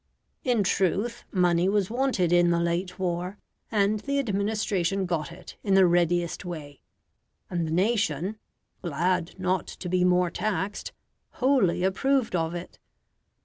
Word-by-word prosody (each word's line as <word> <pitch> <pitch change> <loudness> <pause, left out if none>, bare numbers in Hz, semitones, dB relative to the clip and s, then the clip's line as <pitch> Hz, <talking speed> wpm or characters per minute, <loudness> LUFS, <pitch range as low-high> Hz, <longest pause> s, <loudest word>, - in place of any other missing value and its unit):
In 240 -5 +2
truth 195 +5 0
money 180 -1 +3
was 200 -1 +1
wanted 240 -9 +1
in 175 0 +5
the 170 0 +2
late 170 +2 -1
war, 180 +1 -2 0.3
and 210 0 +2
the 280 +6 -2
administration 200 -5 0
got 170 -3 -2
it 170 - -12
in 195 -2 +2
the 190 -1 +7
readiest 175 0 +1
way; 155 -6 -8 0.7
and 170 -2 -1
the - - -4
nation, 190 -1 0 0.4
glad 175 +2 -1
not 185 0 0
to 180 - -7
be 180 0 +2
more 180 -1 +3
taxed, 205 +1 -2 0.4
wholly 250 -10 +2
approved 240 +4 +1
of 165 0 -1
it. 175 +1 -8
185 Hz, 140 wpm, -27 LUFS, 175-205 Hz, 0.7 s, the